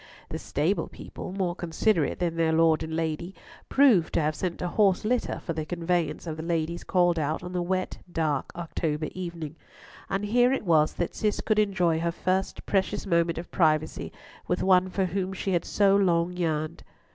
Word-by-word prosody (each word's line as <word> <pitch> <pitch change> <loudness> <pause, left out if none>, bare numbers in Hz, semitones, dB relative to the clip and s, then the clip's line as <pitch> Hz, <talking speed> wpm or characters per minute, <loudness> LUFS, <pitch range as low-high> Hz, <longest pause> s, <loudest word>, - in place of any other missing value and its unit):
The - - -4
stable - - 0
people, - - -8
more 185 -2 -1
considerate 175 0 0
than 170 -2 -1
their 165 -1 +2
Lord 160 -1 +4
and 160 0 -4
Lady, 165 +3 -2 0.3
proved 245 - +4
to - - +4
have 155 +1 +1
sent 175 +2 -3
a - - 0
horse 195 +1 +2
litter 245 +2 0
for 165 - -2
the 160 -1 -3
conveyance 175 +1 -1
of 160 -2 -4
the - - -4
ladies 165 0 -2
called 175 -2 +2
out 155 +3 -1
on 180 0 -6
the 180 - 0
wet 185 +1 -2
dark 155 -5 -1
October 160 -3 -2
evening, 170 -4 -6 0.5
and 195 +1 -1
here 245 +4 +4
it 270 - -1
was 155 -3 +4
that 175 - -2
Cis 210 -2 0
could 215 -1 +1
enjoy 180 -6 +2
her 170 +1 0
first 185 +2 -2
precious 195 +1 0
moment 170 -3 +1
of 170 - -7
privacy 155 -3 +1 0.4
with 180 - 0
one 185 -1 +4
for 190 +1 0
whom 190 +1 -2
she 190 +1 -3
had 175 - +1
so 200 -1 +3
long 175 -3 +2
yearned. 155 -3 -2
175 Hz, 190 wpm, -27 LUFS, 160-190 Hz, 0.5 s, Lord